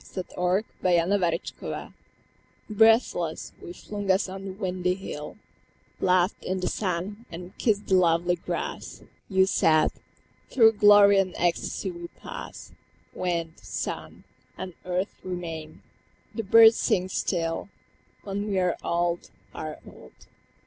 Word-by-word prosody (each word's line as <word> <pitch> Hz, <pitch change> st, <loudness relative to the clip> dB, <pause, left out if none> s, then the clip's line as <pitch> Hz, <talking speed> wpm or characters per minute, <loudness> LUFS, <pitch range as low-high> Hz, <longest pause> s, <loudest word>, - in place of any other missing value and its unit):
I -, -, -18 dB
fell 180 Hz, -1 st, -3 dB
asleep. 215 Hz, -, -4 dB, 0.2 s
The 175 Hz, -1 st, +2 dB
Hill -, -, -7 dB, 0.8 s
Breathless, 215 Hz, -6 st, +3 dB
we -, -, -8 dB
flung 205 Hz, +2 st, -6 dB
us 190 Hz, +2 st, +3 dB
on 190 Hz, +1 st, -7 dB
the 195 Hz, -, -4 dB
windy 185 Hz, -2 st, -1 dB
hill, 150 Hz, -5 st, -7 dB, 0.6 s
Laughed 180 Hz, +1 st, +2 dB
in 185 Hz, 0 st, -2 dB
the 180 Hz, -, -2 dB
sun, 200 Hz, +3 st, -3 dB
and 175 Hz, +3 st, -9 dB
kissed 210 Hz, -3 st, +1 dB
the -, -, -1 dB
lovely 175 Hz, -1 st, +3 dB
grass. -, -, -5 dB, 0.3 s
You 190 Hz, -1 st, +4 dB
said, 155 Hz, -4 st, +3 dB, 0.6 s
"Through 225 Hz, -4 st, +6 dB
glory 205 Hz, -1 st, +7 dB
and 185 Hz, -2 st, -1 dB
ecstasy 175 Hz, +2 st, -1 dB
we 170 Hz, 0 st, -8 dB
pass; -, -, -9 dB, 0.4 s
Wind, 170 Hz, -3 st, -3 dB
sun, 95 Hz, -3 st, -5 dB, 0.3 s
and 185 Hz, -1 st, -6 dB
earth 180 Hz, +2 st, -2 dB
remain, 165 Hz, -4 st, -6 dB, 0.5 s
the 225 Hz, -, -2 dB
birds 225 Hz, +2 st, +7 dB
sing 185 Hz, 0 st, +1 dB
still, 170 Hz, -1 st, -2 dB, 0.5 s
When 200 Hz, +1 st, -3 dB
we 200 Hz, -2 st, -1 dB
are 180 Hz, -2 st, +1 dB
old, 170 Hz, 0 st, -1 dB, 0.2 s
are 155 Hz, -1 st, -6 dB
old. 65 Hz, -, -14 dB
185 Hz, 130 wpm, -26 LUFS, 170-200 Hz, 0.8 s, glory